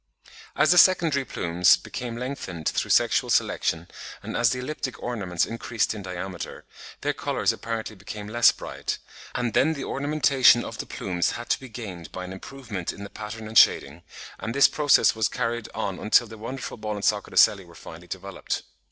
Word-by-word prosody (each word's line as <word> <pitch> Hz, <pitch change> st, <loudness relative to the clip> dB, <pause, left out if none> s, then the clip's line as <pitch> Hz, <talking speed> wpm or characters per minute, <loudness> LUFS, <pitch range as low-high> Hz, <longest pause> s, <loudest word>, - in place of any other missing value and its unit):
As -, -, +4 dB
the 180 Hz, -, +7 dB
secondary 165 Hz, -7 st, +4 dB
plumes 85 Hz, -7 st, +3 dB
became 120 Hz, -1 st, -6 dB
lengthened 120 Hz, -, -5 dB
through -, -, -1 dB
sexual -, -, +3 dB
selection, 85 Hz, +1 st, +1 dB, 0.4 s
and -, -, -5 dB
as 120 Hz, -, +4 dB
the 125 Hz, -, -1 dB
elliptic 130 Hz, 0 st, -4 dB
ornaments 100 Hz, -8 st, -1 dB
increased 115 Hz, -1 st, -1 dB
in 105 Hz, -, -7 dB
diameter, 90 Hz, -1 st, -6 dB, 0.4 s
their -, -, 0 dB
colours -, -, 0 dB
apparently 115 Hz, -1 st, -5 dB
became 105 Hz, +1 st, -8 dB
less 115 Hz, +2 st, +5 dB
bright; -, -, -5 dB, 0.4 s
and 120 Hz, -3 st, -1 dB
then 155 Hz, +8 st, +3 dB
the 140 Hz, -, -5 dB
ornamentation 135 Hz, -4 st, +3 dB
of -, -, -8 dB
the -, -, -5 dB
plumes 90 Hz, -2 st, -1 dB
had 120 Hz, -, -7 dB
to -, -, +2 dB
be 130 Hz, -, -11 dB
gained 95 Hz, -9 st, -8 dB
by 95 Hz, -, -6 dB
an 90 Hz, -, -7 dB
improvement 105 Hz, -3 st, -6 dB
in 100 Hz, -, -10 dB
the 100 Hz, -, -9 dB
pattern 110 Hz, +1 st, -7 dB
and 110 Hz, 0 st, +6 dB
shading; 70 Hz, +5 st, +3 dB, 0.4 s
and 115 Hz, +3 st, -4 dB
this 140 Hz, -, +7 dB
process 145 Hz, -7 st, +4 dB
was 110 Hz, -2 st, +1 dB
carried 115 Hz, -2 st, -2 dB
on 95 Hz, -2 st, -3 dB
until 110 Hz, +3 st, +4 dB
the 110 Hz, 0 st, -11 dB
wonderful 125 Hz, +5 st, -6 dB
ball 105 Hz, -1 st, -4 dB
and 100 Hz, 0 st, -4 dB
socket 105 Hz, -1 st, 0 dB
ocelli 100 Hz, -2 st, +5 dB
were 85 Hz, -1 st, -17 dB
finally 85 Hz, +2 st, -11 dB
developed. 95 Hz, +1 st, -5 dB
110 Hz, 185 wpm, -25 LUFS, 95-125 Hz, 0.4 s, the